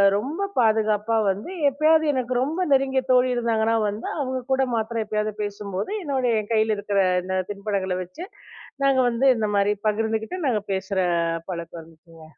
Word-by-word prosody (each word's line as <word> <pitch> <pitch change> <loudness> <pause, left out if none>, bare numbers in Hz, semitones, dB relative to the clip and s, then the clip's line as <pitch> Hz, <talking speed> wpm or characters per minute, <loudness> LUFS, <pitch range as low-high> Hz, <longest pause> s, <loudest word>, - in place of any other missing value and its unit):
ரொம்ப 285 - -3 0.2
பாதுகாப்பா 220 -1 +2
வந்து 205 - -3 0.2
எப்பயாவது 310 +3 +3
எனக்கு 255 -1 -1
ரொம்ப 330 +6 -1
நெருங்கிய 265 -1 +3
தோழி 255 0 +4
இருந்தாங்கன்னா 230 -1 +1
வந்து, 210 +3 -5
அவுங்ககூட 260 0 0
மாத்திரம் 225 0 -1
எப்பயாவது 215 0 -2
பேசும்போது, 200 - -4
என்னுடைய 260 -5 0
என் 210 - -11
கையில 220 -1 +2
இருக்கிற 205 -1 -1 0.2
இந்த 190 0 -2
தின்பண்டங்கள 200 -2 -2
வச்சு 250 - -9 0.6
நாங்க 275 -1 +3
வந்து 240 +3 0
இந்தமாரி 205 -2 +1 0.2
பகிர்ந்துக்கிட்டு, 220 - -2
நாங்க 220 -4 +1
பேசுற 190 0 -2 0.5
பழக்கம் 170 -1 -6
இருந்துச்சுங்க. 165 0 -18
220 Hz, 140 wpm, -24 LUFS, 205-260 Hz, 0.6 s, தோழி